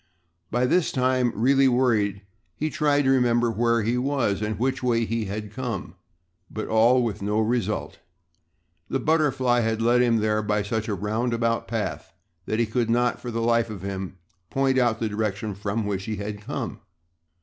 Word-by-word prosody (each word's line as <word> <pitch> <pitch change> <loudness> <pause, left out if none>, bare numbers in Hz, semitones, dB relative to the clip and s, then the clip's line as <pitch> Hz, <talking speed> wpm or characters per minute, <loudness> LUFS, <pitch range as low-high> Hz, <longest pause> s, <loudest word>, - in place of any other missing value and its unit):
By 120 +2 +1
this 170 +6 +2
time, 130 -2 +1
really 135 +5 +4
worried, 110 -6 +1 0.3
he 155 +1 -2
tried 145 -1 +2
to 135 - +3
remember 120 -2 +3
where 115 0 +1
he 120 +3 0
was 125 -7 0
and 105 0 -2
which 130 +3 -1
way 115 -2 +1
he 115 0 -2
had 105 +1 -5
come, 125 -8 -4 0.6
but 110 - -5
all 120 +3 +4
with 115 -4 -3
no 105 +2 0
result. 110 -2 -1 0.9
The 135 - 0
butterfly 135 -4 +2
had 110 -1 0
led 120 +2 +3
him 120 -2 +3
there 110 0 +1
by 105 -1 0
such 110 +1 -2
a 105 - -1
roundabout 115 +3 -1
path - - -4 0.3
that 110 - -1
he 115 - +2
could 115 +1 -1
not, 120 +1 +1
for 125 - -5
the 115 0 -2
life 115 0 +2
of 100 -4 -7
him, 95 -1 -5 0.3
point 135 -1 +2
out 120 -3 +2
the 115 - 0
direction 105 0 -2
from 100 +2 -3
which 100 -1 -3
he 110 -1 -3
had 105 +1 -5
come. - - -5
115 Hz, 180 wpm, -25 LUFS, 105-125 Hz, 0.9 s, really